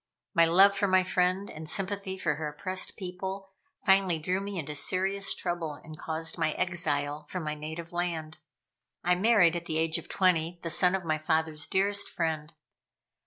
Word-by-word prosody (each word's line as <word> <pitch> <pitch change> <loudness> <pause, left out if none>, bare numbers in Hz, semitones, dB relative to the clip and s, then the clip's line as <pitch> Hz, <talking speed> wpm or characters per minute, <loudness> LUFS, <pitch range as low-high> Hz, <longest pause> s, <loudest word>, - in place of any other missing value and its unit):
My 170 -3 +6
love 195 +4 +6
for 200 +1 +1
my 185 -1 +4
friend, 185 +2 +1
and 155 0 -7
sympathy 195 +1 -3
for - - 0
her 155 -1 -3
oppressed 185 +5 -4
people, 190 +1 -5 0.3
finally 190 -4 +4
drew 180 +5 -1
me 200 -1 -5
into 150 -3 -4
serious 190 +6 -1
trouble 175 -3 -3
and 155 +2 -11
caused 160 +2 -4
my 155 -2 +1
exile 150 -4 -1
from 180 -3 -4
my 150 -1 -2
native 160 +3 -7
land. 165 -3 -3 0.6
I 180 - +4
married 180 -3 +4
at 170 0 -4
the 160 -2 -2
age 160 0 +1
of - - -13
twenty 175 -2 +2
the 165 - -2
son 180 +3 +3
of 185 -2 -4
my 155 -1 0
father's 160 -1 0
dearest 200 +1 +3
friend. 160 -2 -2
175 Hz, 175 wpm, -29 LUFS, 160-190 Hz, 0.6 s, My